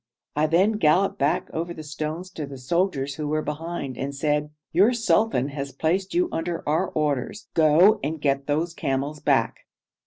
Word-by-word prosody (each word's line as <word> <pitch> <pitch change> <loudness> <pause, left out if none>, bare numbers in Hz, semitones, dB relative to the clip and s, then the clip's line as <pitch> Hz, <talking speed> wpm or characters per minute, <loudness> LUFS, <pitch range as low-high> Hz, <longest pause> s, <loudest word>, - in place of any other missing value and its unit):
I 150 +1 +2
then 180 +7 +3
galloped 180 +5 +3
back 140 +2 +1
over 170 +2 -3
the 155 - -8
stones 155 +4 -5
to 155 -5 -5
the 140 -1 -8
soldiers 140 0 -1
who 150 -1 -3
were 155 +1 0
behind, 150 -3 -5
and 140 +1 -3
said, 150 +1 0 0.2
'Your 200 +9 +4
sultan 225 - +2
has 140 -1 -5
placed 185 - -1
you 355 0 +3
under 165 +1 -3
our 155 +2 +2
orders; 150 +5 -2
go 170 +7 +5
and 155 +2 -2
get 140 -1 0
those 160 +4 0
camels 140 0 -2
back.' - - +1
155 Hz, 175 wpm, -24 LUFS, 145-175 Hz, 0.2 s, go